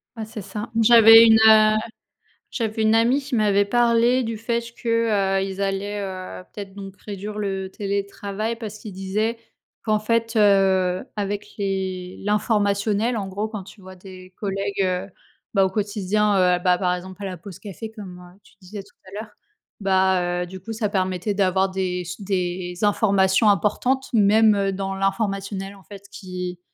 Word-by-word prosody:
Bah, 220 -1 -5
c'est 220 0 -8
ça. 205 +3 -7
J'avais 225 0 +9
une, 220 -1 +6
heu, 215 0 +6 0.7
j'avais 220 -2 -3
une 220 +1 +3
amie 240 +5 +3
qui 270 -2 -4
m'avait 205 -2 +3
parlé 240 +3 +3
du 225 -1 -4
fait 235 +1 -2 0.2
que, 215 -5 +1
heu, - - 0
ils 195 0 -5
allaient, 200 +1 -2
heu, 185 -1 -7
peut-être, 200 -2 -8
donc 195 -1 -9
réduire 205 +1 -6
le 195 -2 -3
télétravail 200 +2 -4
parce 215 -2 -7
qu'ils 210 - -9
disaient 210 +5 -2 0.5
qu'en 215 -1 +1
fait, 230 +1 -1
heu, 190 -3 +3
avec 205 0 -3
les 190 -2 -3
l'informationnel, 210 +2 +1
en 200 -2 -3
gros 205 +3 -3
quand 215 -3 -7
tu 200 +2 -15
vois 185 0 -12
des 185 0 -13
collègues, 195 -1 -3
heu, 185 +1 -1 0.5
bah, 195 -2 +4
au - - 0
quotidien, 210 +1 0 0.2
heu, - - -7
bah, 180 -1 +3
par 180 -1 0
exemple 185 +2 -10
à - - -3
la 185 -2 -5
pause 180 +1 -11
café 215 +2 -8
comme, 195 -5 -10
heu, 180 +2 -16
tu - - -22
disais 195 +2 -9
tout 200 - -23
à 185 - -13
l'heure. 220 - -12 0.5
Bah 190 -2 +1
heu, - - -5
du 185 +1 -10
coup 225 +5 -7
ça 215 -2 -2
permettait 185 +1 -1
d'avoir 190 -1 +1
des 185 -1 -2
s 175 +4 -8
des 180 -2 -3
informations 200 0 +3
importantes, 245 +7 +1
même, 215 0 +5
heu, 195 -1 0
dans 195 0 -3
l'informationnel 195 0 -2
en 195 - -17
fait 200 -1 -12
qui 180 -2 -6
200 Hz, 175 wpm, -22 LUFS, 190-215 Hz, 0.7 s, J'avais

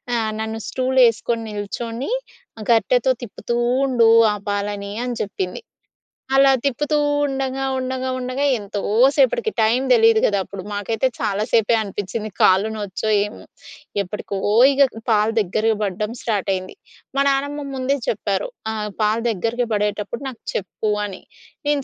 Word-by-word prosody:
ఆహ్, 220 -2 0
నన్ను 220 0 -3
"స్టూలేసుకొని 245 -3 +2
నిల్చొని, 230 - -4 0.6
గరిటెతో 245 +2 +3
తిప్పుతూ 235 +1 -4 0.3
ఉండు 240 -4 +4 0.2
ఆ - - -3
పాలని" 205 0 -3
అని 245 -1 -3
చెప్పింది. 190 - -4 0.7
అలా 270 0 +6
తిప్పుతూ 295 +3 +1 0.3
ఉండంగా 270 -1 -2
ఉండగా 260 0 -2
ఉండగా 255 +3 -2
ఎంతో 205 0 -5 0.4
సేపటికి 300 - +2
టైం 225 +4 +3
తెలీదు 225 -2 +6
కదా! 205 - +2
అప్పుడు 200 -1 -8
మాకైతే 215 +5 0
చాలా 205 +1 -1
సేపే 230 0 +4
అనిపిచ్చింది 205 +1 -4
కాలు 190 +4 +5
నొచ్చో 210 0 -3 0.2
ఏమో? 210 - -10 0.6
ఎప్పటికో 200 +1 -5 0.3
ఇగ 280 0 +5 0.2
పాలు 215 0 +3
దగ్గరికి 215 +3 +1
పడడం 210 +2 -2
స్టార్టయింది. 195 -4 -2 0.4
మా 275 - +4
నానమ్మ 285 +1 -1
ముందే 265 +2 0
చెప్పారు, 200 -2 -1 0.2
"ఆహ్, 210 -1 -3
పాలు 215 +2 +2
దగ్గరికి 230 +4 -1
పడేటప్పుడు 210 +4 -2
నాకు 245 - -12
చెప్పు" 210 +2 -2
అని. 195 -2 -8 0.5
నేను 290 -1 +1
225 Hz, 130 wpm, -21 LUFS, 205-255 Hz, 0.7 s, అలా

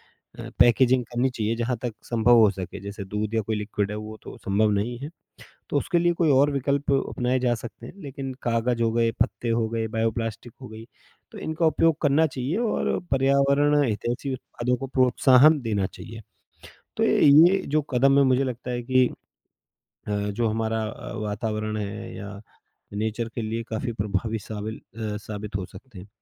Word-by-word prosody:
अ, - - -12
packaging 125 +1 +5
करनी 120 +3 0
चाहिए 115 -2 -2
जहाँ 120 +1 -1
तक 120 -3 -3
संभव 120 0 +3
हो 110 -2 +6
सके। 95 0 -7
जैसे 100 0 -7
दूध 105 +2 -3
या 110 - +2
कोई 110 +1 -3
लिक्विड 105 -1 -2
है 105 - -4
वो 110 0 -7
तो - - -10
संभव 105 +2 +1
नहीं 110 +4 -1
है, 145 +2 -6 0.6
तो - - 0
उसके 175 -3 +1
लिए 175 0 +3
कोई 165 -2 +2
और 140 +2 +4
विकल्प 140 +1 0
अपनाए 130 -1 0
जा 120 -1 +2
सकते 115 +1 -9
हैं। - - -10
लेकिन 135 -2 -6
कागज़ 115 0 0
हो 115 - +2
गए, 115 0 +2
पत्ते 105 +5 0
हो 115 -1 +1
गए, 115 -1 -2
बायोप्लास्टिक 115 +1 -2
हो 130 - -8
गई, 110 +1 -10 0.5
तो - - -9
इनका 160 +1 -1
उपयोग 160 0 +3
करना 150 +2 +4
चाहिए 135 +5 -3
और 230 -2 0
पर्यावरण 140 +2 +3
हितैषी 120 +4 -2
उत्पादों 125 0 -2
को 135 - -5
प्रोत्साहन 130 +3 +5
देना 105 -4 0
चाहिए। 115 +4 -10 0.8
तो - - +2
ये 165 +7 +6
जो 155 - +4
कदम 135 +2 +4
है 140 - +6
मुझे 130 +1 +3
लगता 125 -1 -5
है 120 0 -3
कि 130 0 +3 1.0
अ, - - -3
जो 105 +2 -1
हमारा 110 0 -1
अ, 110 - -7
वातावरण 110 0 -3
है 105 +2 -5
या 100 0 -8 0.5
नेचर 110 +3 -2
के 120 - -3
लिए 115 +1 -3
काफ़ी 115 +2 -3
प्रभावी 105 +1 -2
सावील 110 +1 -6
अ, 110 0 -6
साबित 105 -1 -5
हो 95 -2 -4
सकते 105 +2 -14
हैं। 95 - -11
115 Hz, 185 wpm, -25 LUFS, 110-130 Hz, 1.0 s, हो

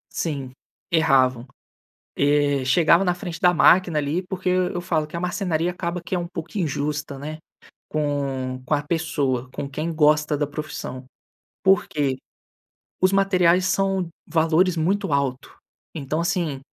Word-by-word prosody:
Sim, 140 -6 -3 0.4
erravam. 130 -6 +3 0.7
Eh, 145 -1 +2
chegava 170 +6 +4
na 180 -2 +1
frente 175 -1 -7
da 180 -2 +5
máquina 175 -1 +4
ali 150 +5 -1
porque 185 0 -4
eu 180 0 +1
eu 175 - -3
falo 160 -3 -1
que 155 - -8
a - - -3
marcenaria 175 -2 -1
acaba 175 0 -4
que - - -4
é - - +1
um 175 - -3
pouco 170 +1 -8
injusta, 150 -3 -2
né, 155 +3 -6 0.5
com 135 -4 -2
com 150 - +1
a 145 - 0
pessoa, 145 -6 -1
com 140 - -5
quem 155 +4 -3
gosta 150 -1 +3
da 145 - 0
profissão. 145 -3 -6 0.6
Por 195 -1 +4
quê? 140 -3 -1 0.9
Os 185 +1 +4
materiais 185 -2 +3
são 195 -1 0 0.2
valores 165 +2 +2
muito 185 +1 0
alto. 135 -2 -2 0.4
Então, 155 0 -2
assim, 170 -5 -1
155 Hz, 150 wpm, -23 LUFS, 145-180 Hz, 0.9 s, da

